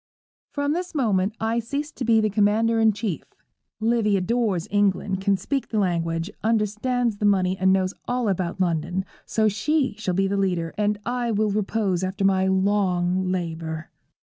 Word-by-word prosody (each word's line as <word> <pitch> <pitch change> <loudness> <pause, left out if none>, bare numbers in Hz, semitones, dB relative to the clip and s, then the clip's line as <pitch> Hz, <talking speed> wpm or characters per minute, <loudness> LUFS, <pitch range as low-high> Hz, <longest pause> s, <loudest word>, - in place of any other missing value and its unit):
_ - - -64
'From 285 0 0
this 355 0 -4
moment 210 -6 +1
I 225 +1 0
cease 285 +6 -4
to 270 - -6
be 230 -1 +4
the 215 -1 +1
commander 220 +3 +2
in 220 -1 +5
chief. 205 -4 -3 0.6
Livy 220 -2 +2
adores 205 -3 0
England, 200 -1 +1
can 195 0 +2
speak 275 +6 -2
the 220 - -3
language, 170 -2 0
understands 225 +2 0
the 210 - -1
money, 190 -2 +3
and 190 0 +2
knows 190 0 +1
all 245 -1 0
about 185 -2 -1
London; 175 +1 0 0.2
so 220 -1 +2
she 260 +6 +1
shall 185 -4 -1
be 195 +1 +2
leader, 185 -4 -1
and 210 0 0
I 245 0 -1
will 215 -1 +1
repose 200 -3 0
after 190 +1 -1
my 190 -1 +3
long 190 -2 +1
labour.' 165 -3 -4
205 Hz, 165 wpm, -24 LUFS, 185-225 Hz, 0.6 s, in